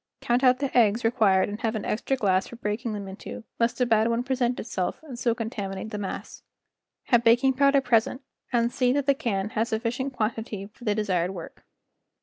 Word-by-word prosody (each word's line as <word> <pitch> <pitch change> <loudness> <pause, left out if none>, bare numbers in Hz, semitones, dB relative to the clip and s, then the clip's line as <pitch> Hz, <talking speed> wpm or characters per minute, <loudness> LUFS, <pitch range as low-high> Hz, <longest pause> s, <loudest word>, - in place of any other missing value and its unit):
Count 245 +2 +1
out 255 -1 +5
the 275 0 -3
eggs 230 -1 +4
re¬ 225 +1 +2
quired 195 -6 +3
and 205 +2 -6
have 225 0 -1
an 215 - -3
extra 265 +5 -1
glass 190 -5 +1
for - - -10
breaking 220 +1 -3
them 200 -2 -5
into, 190 +3 -8 0.2
lest 235 +1 +1
a 250 - +3
bad 225 -1 +3
one 235 +1 0
present 250 -2 0
itself 185 -5 -3
and 265 -6 -9
so 235 -2 +1
contaminate 215 -3 -5
the 210 - -4
mass. 195 - -6 0.7
Have 240 -2 +4
baking 240 +3 +5
powder 275 +1 +4
present 245 +1 +1 0.3
and 235 -1 +2
see 250 -1 +2
that 285 -1 0
the 280 - +4
can 210 -6 -2
has 225 +2 -1
sufficient 245 +4 -2
quantity 220 -3 -3
for 245 - -14
the 210 -2 +1
desired 190 -3 0
work. 170 - -10
230 Hz, 205 wpm, -26 LUFS, 210-250 Hz, 0.7 s, out